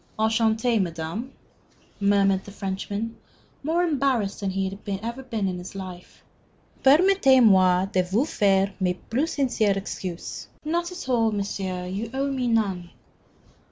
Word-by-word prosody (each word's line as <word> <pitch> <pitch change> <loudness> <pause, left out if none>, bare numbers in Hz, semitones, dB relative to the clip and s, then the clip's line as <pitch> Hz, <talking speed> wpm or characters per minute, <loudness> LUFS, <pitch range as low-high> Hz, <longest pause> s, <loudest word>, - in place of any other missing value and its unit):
"Enchanté, 220 +1 +2
madame," 170 +8 -4 0.7
murmured 200 -1 +3
the - - -11
Frenchman, 200 +3 -4 0.5
more 325 +5 +1
embarrassed 270 - 0
than 200 - -2
he 190 0 -1
had 195 +1 -7 0.2
ever 235 +3 -4
been 225 -6 -2
in 180 -1 -3
his 180 +2 -9
life. 185 -2 -9 0.6
"Permettez 290 -2 +6
moi 185 -3 +5
de 190 -1 +1
vous 195 +9 +1
faire 195 -6 +2
mes 180 -2 +1 0.2
plus 290 +8 0
sincères 225 -8 +1
excuses." 185 -3 -6 0.2
"Not 345 +3 -1
at 360 -6 -7
all, 230 -3 +2
monsieur, 195 -3 -3
you 200 +5 -4
owe 275 +1 0
me 255 -2 -1
none." 195 -7 0
205 Hz, 140 wpm, -25 LUFS, 190-255 Hz, 0.7 s, Permettez